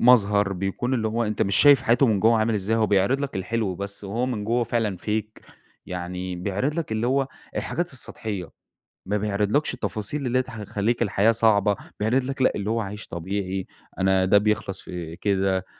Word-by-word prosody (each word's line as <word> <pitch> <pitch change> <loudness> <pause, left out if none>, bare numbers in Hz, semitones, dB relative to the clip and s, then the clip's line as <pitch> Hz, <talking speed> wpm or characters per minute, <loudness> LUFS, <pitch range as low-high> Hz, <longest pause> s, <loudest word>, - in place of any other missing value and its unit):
مظهر، 105 -5 +5
بيكون 95 +7 -2
اللي 110 -3 0
هو 115 +2 0
أنت 105 -1 0
مش 100 - +1
شايف 145 -3 +7
حياته 120 +4 +4
من 105 -4 +2
جوّه 115 +1 +4
عامل 110 +1 +1
إزاي، 105 +2 0
هو 110 -1 +3
بيعرض 100 +7 +2
لك 140 -7 -3
الحلو 100 0 -1
بس، 100 +2 -5
وهو 115 +6 -1
من 115 -5 -3
جوّه 120 +2 +1
فعلًا 115 -4 -1
fake 110 +2 -3 0.4
يعني 90 0 -4
بيعرض 100 +11 -1
لك 160 -9 -3
اللي 110 +2 0
هو 135 +1 +1 0.3
الحاجات 175 -3 -2
السطحيّة. 105 -6 -4 0.6
ما 105 +2 0
بيعرض 105 +3 +1
لكش 150 - -1
التفاصيل 120 +7 -3
اللي 125 0 +1
هي - - +4
ت 130 - -13
هتخلّيك 110 0 -2
الحياة 110 0 +3
صعبة. 105 -3 +3 0.2
بيعرض 115 +5 +2
لك 135 +1 -4
لأ، 130 - +5
اللي 100 0 -3
هو 115 +1 +1
عايش 105 +1 -6
طبيعي، 95 +2 -3 0.3
أنا 95 0 +3
ده 100 +2 +5
بيخلص 100 -2 0
في 85 -2 -7
كده، 95 -1 0
105 Hz, 195 wpm, -24 LUFS, 95-120 Hz, 0.6 s, شايف